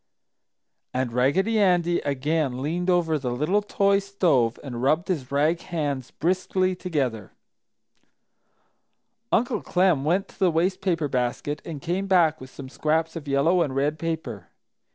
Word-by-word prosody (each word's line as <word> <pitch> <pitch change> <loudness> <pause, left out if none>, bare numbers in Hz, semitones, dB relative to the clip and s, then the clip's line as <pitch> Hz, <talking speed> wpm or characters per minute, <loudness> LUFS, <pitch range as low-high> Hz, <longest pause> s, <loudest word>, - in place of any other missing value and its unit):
And 130 -2 -1
Raggedy 190 - +2
Andy 175 -3 +3
again 145 -1 -1
leaned 170 +6 -2
over 165 -4 +2
the 130 -2 -3
little 150 +12 +1
toy 200 -1 +2
stove 170 - +1
and 120 -4 -6
rubbed 155 +8 +1
his 140 -8 -2
rag 155 +4 +1
hands 145 -7 -3
briskly 185 +1 0
together. 135 - -3 2.0
Uncle 240 +1 +1
Clem 180 -6 +2
went 185 +6 +1
to - - -19
the 185 - +4
waste 175 +3 0
paper 170 -6 0
basket 130 +3 -2
and 150 -4 -7
came 185 +3 -2
back 170 -6 +3
with 130 - -9
some 135 0 -10
scraps 160 +4 -1
of 155 -3 -7
yellow 150 +6 +3
and 140 -5 -1
red 145 +3 0
paper. 145 - -4
160 Hz, 145 wpm, -25 LUFS, 140-180 Hz, 2.0 s, the